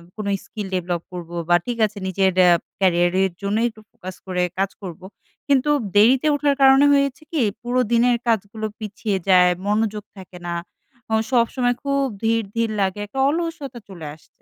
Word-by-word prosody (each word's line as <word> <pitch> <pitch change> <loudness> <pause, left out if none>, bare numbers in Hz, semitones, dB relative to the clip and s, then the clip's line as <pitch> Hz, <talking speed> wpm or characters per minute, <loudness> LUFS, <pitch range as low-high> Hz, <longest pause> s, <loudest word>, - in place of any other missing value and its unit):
কোন 215 - -5 0.2
skill 210 -3 -6
develop 175 -1 -2
করবো 175 -1 -7
বা, 175 - +6
ঠিক 240 - -2
আছে 210 0 -7
নিজের 190 0 +2
এ্যা 180 - +6 0.3
কেরিয়ারের 185 0 +2
জন্যই 210 +4 0
একটু 215 -1 -16
ফোকাস 185 0 -9
করে 180 -1 0 0.2
কাজ 195 0 +1
করবো। 185 -1 -8 0.4
কিন্তু 280 0 +2 0.3
দেরিতে 250 +8 +5
ওঠার 285 -1 +1
কারণে 270 +1 +7
হয়েছে 280 -1 +1
কি? 310 -5 0 0.2
পুরো 245 +1 0
দিনের 240 +1 +3
কাজগুলো 215 0 -1
পিছিয়ে 210 -1 -3
যায়। 180 -1 +6 0.2
মনোযোগ 210 0 0
থাকে 185 -1 -11
না। 170 - -2 0.6
অ - - +5 0.2
সবসময় 245 0 +2
খুব 275 0 +1 0.2
ধীর, 225 0 +2
ধীর 230 -1 0
লাগে। 190 +1 -1
একটা 265 +6 -6
অলসতা 320 -6 -4
চলে 170 -5 -9
আসছে। 155 - -24
215 Hz, 165 wpm, -21 LUFS, 185-250 Hz, 0.6 s, কারণে